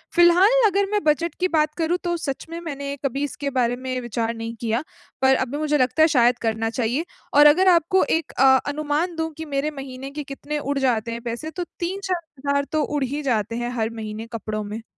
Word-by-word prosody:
फिलहाल 370 +8 +6
अगर 400 0 +2
मैं 415 -1 0
बजट 315 +2 +1
की 365 - +2
बात 305 -3 +1
करूँ, 335 +2 +1
तो 345 -1 0
सच 275 -4 -4
में 335 +1 -5
मैंने 280 -3 -5
कभी 275 +2 -1
इसके 285 0 -3
बारे 245 -2 +1
में 255 0 -4
विचार 230 0 -2
नहीं 230 0 -5
किया। 230 +4 0 0.4
पर 265 0 +5
अभी 260 +3 -2
मुझे 300 -1 +1
लगता 255 +4 +2
है, - - +7
शायद 245 -4 +3
करना 225 0 0
चाहिए 250 +7 -1 0.3
और 295 +1 +7
अगर 365 +6 +5
आपको 350 +1 +4 0.2
एक 320 - -11
अ, 265 - +3 0.2
अनुमान 305 +4 -1
दूँ 320 0 -2
कि 320 - -5
मेरे 295 +3 0
महीने 270 +1 -8
के 295 0 -5
कितने 290 +2 -5
उड़ 285 0 -2
जाते 235 -3 +1
हैं 235 0 -5
पैसे, 240 +7 -5
तो 355 +1 -4 0.2
3-4 370 0 -2 0.3
हज़ार 280 0 +2
तो 310 -1 +1
उड़ 295 -2 -1
ही 285 +4 -2
जाते 230 -3 0
हैं 240 0 -2
हर 220 0 +1
महीने 215 +1 -6
कपड़ों 215 -1 -3
में। 215 +2 -6
280 Hz, 215 wpm, -23 LUFS, 240-320 Hz, 0.4 s, है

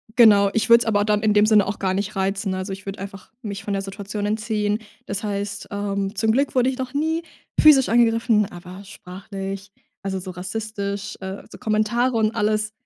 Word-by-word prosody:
genau. 205 -4 +7
Ich 220 0 0
würde 235 0 +8
es - - -13
aber 205 -2 +2
dann 210 0 +1
in 215 -1 +3
dem 210 0 +5
Sinne 215 -2 +5
auch 200 - -4
gar 190 -1 0
nicht 200 +2 -3
reizen, 195 +1 -1
ne? 185 - -2
Also, 185 +1 -4
ich 195 +1 -7
würde 195 -1 -6
einfach 195 +2 -9
mich 200 -4 -6
von 205 - -3
der 195 - -1
Situation 200 +1 -5
entziehen. 210 0 -1 0.3
Das 200 +1 -4
heißt, 205 0 -3
ähm, 200 0 -2
zum 220 +2 +2
Glück 270 +5 +1
wurde 255 0 +4
ich 260 - -4
noch 255 -1 -5
nie 320 +3 0 0.4
physisch 290 -4 +7
angegriffen, 230 -2 +3
aber 180 +2 -10
sprachlich, 195 +1 -7 0.3
also, 195 -1 -3
so 185 0 -7
rassistisch, 200 +2 -5
äh, 190 +1 -6
so - - -10
Kommentare 235 +2 +1
und 220 0 +1
alles 215 0 0
205 Hz, 205 wpm, -22 LUFS, 195-220 Hz, 0.4 s, würde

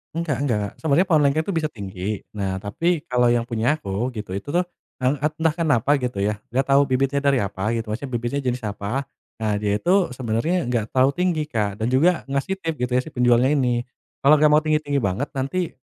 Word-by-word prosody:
Enggak 165 -5 -1
enggak. 105 -5 0
Sebenarnya, 160 +4 +2
pohon 155 -3 +5
lengkeng 140 +3 +3
tuh 185 - -1
bisa 155 - 0
tinggi. 100 0 -5 0.2
Nah, 95 -1 -2
tapi, 165 +10 0
kalau 125 -1 +3
yang 120 +1 -1
punya 115 +4 +1
aku, 105 +6 -2
gitu, 105 -4 -5
itu 145 +9 -6
tuh, 175 - +4 0.4
en 130 +3 +2
et 150 +1 0
entah 160 -1 +3
kenapa, 145 -3 +2
gitu 125 -6 -3
ya, 105 +1 0 0.2
nggak 135 +2 +2
tau 140 +1 +6
bibitnya 135 +1 0
dari 140 -3 +2
apa, 100 +3 -2
gitu, 115 -1 -3
maksudnya, 130 +5 -4
bibitnya 120 +3 -1
jenis 125 0 -1
apa. 105 +6 -4 0.3
Nah, 105 -2 0
dia 100 -1 0
itu, 180 -5 +2
sebenarnya, 125 +6 -1
nggak 115 -3 0
terlalu 130 +1 +4
tinggi, 175 -4 +1
Kak. 105 -3 -2
Dan 115 - +1
juga, 160 +8 +3
ngasih 140 +7 -1
tips, 165 -2 -3
gitu 125 - -9
ya, 125 - +3
si 160 - -10
penjualnya 125 0 +3
ini. 120 -2 +1 0.4
"Kalau 150 +2 +6
nggak 150 0 +4
mau 150 - +5
tinggi-tinggi 150 -2 0
banget, 100 +7 -1
nanti 140 +7 -2
130 Hz, 210 wpm, -23 LUFS, 110-150 Hz, 0.4 s, tau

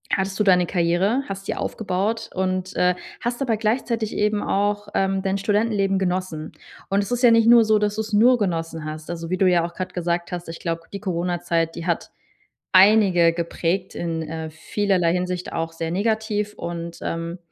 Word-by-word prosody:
hattest 190 0 -2
du - - +4
deine 180 -3 +4
Karriere, 185 +9 +1
hast 195 0 -6
sie - - -1
aufgebaut 220 +3 -2
und, 185 0 -2
äh, 180 0 +3 0.3
hast 240 +2 -3
dabei 240 -5 +1
gleichzeitig 225 0 -1
eben 210 0 +1
auch, 205 +1 0
ähm, 195 0 0
dein 195 0 0
Studentenleben 205 -1 +1
genossen. 180 -4 -2 0.4
Und 195 +1 +2
es 200 - -7
ist 245 +1 -1
ja 240 - +8
nicht 230 0 +5
nur 235 -1 +8
so, 215 0 +3
dass 210 0 0
du 220 - -1
es 215 0 -7
nur 240 +4 +6
genossen 165 -6 -2
hast. 155 0 -7
Also, 165 -1 -5
wie 185 - +1
du 190 - +3
ja 175 -2 +3
auch 170 - -7
gerade 185 0 -5
gesagt 175 -1 -2
hast, 175 -1 -5
ich 165 - -7
glaube, 165 0 -3
die 200 - -4
Corona-Zeit, 175 -3 -1
die 170 - -6
hat 170 - -1 0.6
einige 190 -3 +6
geprägt, 170 +2 -2
in, 165 -1 -3
äh, 160 0 -5
vielerlei 180 +2 0
Hinsicht 180 0 -3
auch 165 0 -2
sehr 165 0 -4
negativ. 210 +1 -1
Und, 170 0 -6
ähm, 165 +1 -4
185 Hz, 190 wpm, -23 LUFS, 170-210 Hz, 0.6 s, ja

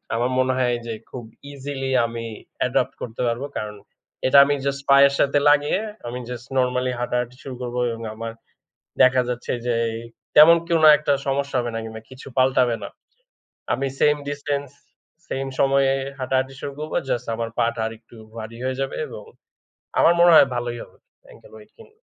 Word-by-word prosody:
আমার 120 +2 0
মনে 130 0 +2
হয় 125 -1 +1
যে, 115 - -4 0.2
খুব 125 - -7 0.3
ইজিলি 135 -1 -5 0.2
আমি 115 0 -5 0.4
অ্যাডপ্ট - - +1
করতে 115 0 -5
পারবো। 120 +4 -2
কারণ 105 0 -5 0.5
এটা 135 - +5
আমি 145 +1 +1
জাস্ট 140 0 -1
পায়ের 140 0 +7
সাথে 140 +1 +3
লাগিয়ে 145 +4 +3 0.3
আমি 120 +1 -5
জাস্ট 125 0 -7
নরমালি 125 0 +1
হাঁটাহাঁটি 125 0 -2
শুরু 135 -2 -7
করব 120 -1 -5 0.2
এবং 115 0 -7
আমার 115 +1 -5 0.7
দেখা 130 0 +5
যাচ্ছে 120 -1 -4 0.2
যে, 120 - +1 0.6
তেমন 155 +3 +9
কোনো 165 -2 +4
একটা 145 -1 0
সমস্যা 140 0 -1
হবে 120 -1 -2
না 115 - -2
কিংবা 110 0 -8
কিছু 130 +1 -12
পাল্টাবে 130 -2 +3
না। 100 - -6 0.8
আমি 135 0 -1
স্যাম 150 0 +4
ডিসট্যান্স, 145 -1 -3 0.6
স্যাম 135 0 -3
সময়ে 135 0 +3 0.3
হাঁটাহাঁটি 130 +1 -1
শুরু 140 - -5
করব। 155 +1 -6 0.2
জাস্ট 120 0 -2
আমার 115 0 -3
পা'টা 115 -1 0
আরেকটু 115 +1 -12 0.2
ভারি 115 +1 -7
হয়ে 130 0 -2
যাবে 135 - -3
এবং - - -9 0.8
আমার 170 - +6
মনে 175 0 +7
হয় 140 - +8
ভালোই 120 0 -3
হবে - - -19 0.3
অ্যাঙ্কেল - - -17
ওয়েট 440 -1 -15
কিনলে। 445 -1 -19
130 Hz, 170 wpm, -22 LUFS, 120-140 Hz, 0.8 s, তেমন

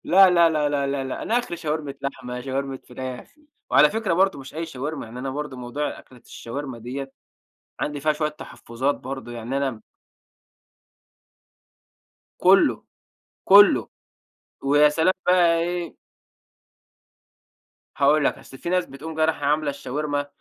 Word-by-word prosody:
لا 190 +1 +7
لا 170 -2 +5
لا 150 -2 +1
لا 140 -1 0
لا 140 -1 -2
لأ، 130 - -5
أنا 235 +2 +1
آخري 205 -8 -5
شاورما 155 -3 -3
لحمة، 125 -2 -5
شاورما 135 0 -3
فراخ، 130 - -7 0.4
وعلى 150 +1 +6
فكرة 220 -4 -1
برضه 190 -3 +2
مش 135 +2 -11
أي 165 +1 -3
شاورما 145 0 -5
يعني 120 +3 -9
أنا 135 +1 -3
برضه 145 -1 -5
موضوع 125 +4 -4
أكلة 125 - -16
الشاورما 125 +1 -7
دِيَّة، 135 +4 -6 0.7
عندي 150 -1 -3
فيها 155 +2 +2
شوية 150 0 -1
تحفظات 135 -2 -3
برضه 130 -2 -7
يعني 120 +3 -4
أنا 135 -5 -2 2.6
كلّه، - - +4 0.6
كلّه 200 +1 +7 0.7
ويا 145 +2 +5
سلام 160 +5 +2
بقي 175 -2 +4
إيه 175 0 -3 2.0
هاقول 145 +1 +4
لَك - - +1
اصل 135 - -13
في 170 - -5
ناس 180 -1 +1
بتقوم 155 +4 -9
جاية 155 0 +3
رايحة 150 -3 -1
عاملة 150 0 +1
الشاورما 145 +1 -3
145 Hz, 140 wpm, -23 LUFS, 135-160 Hz, 2.6 s, لا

